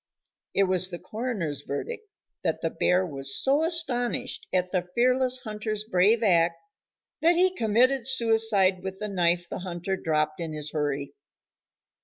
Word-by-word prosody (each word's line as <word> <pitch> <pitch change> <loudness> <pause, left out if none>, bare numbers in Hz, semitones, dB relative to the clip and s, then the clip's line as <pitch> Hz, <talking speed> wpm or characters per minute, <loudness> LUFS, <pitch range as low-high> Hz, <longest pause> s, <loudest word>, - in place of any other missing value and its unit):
It 195 - +4
was 185 -1 +1
the 175 - -6
coroner's 210 - -4
verdict 435 - -6 0.4
that - - -1
the - - -1
bear 180 +1 +1
was 135 -4 -2
so 280 +3 +2
astonished 290 -8 0
at 180 -1 0
the 180 -2 -2
fearless 255 +1 +3
hunter's 215 -1 -4
brave 215 +3 +2
act 170 -4 +3 0.7
that 335 +2 +4
he 365 +1 +3
committed 240 - +2
suicide 225 -7 +3
with 190 0 -6
the 210 - -4
knife 175 -3 +1
the - - -6
hunter 180 +1 -4
dropped 155 -3 -1
in 165 -2 -4
his 150 -1 -4
hurry. 145 -2 -2
195 Hz, 150 wpm, -26 LUFS, 175-240 Hz, 0.7 s, It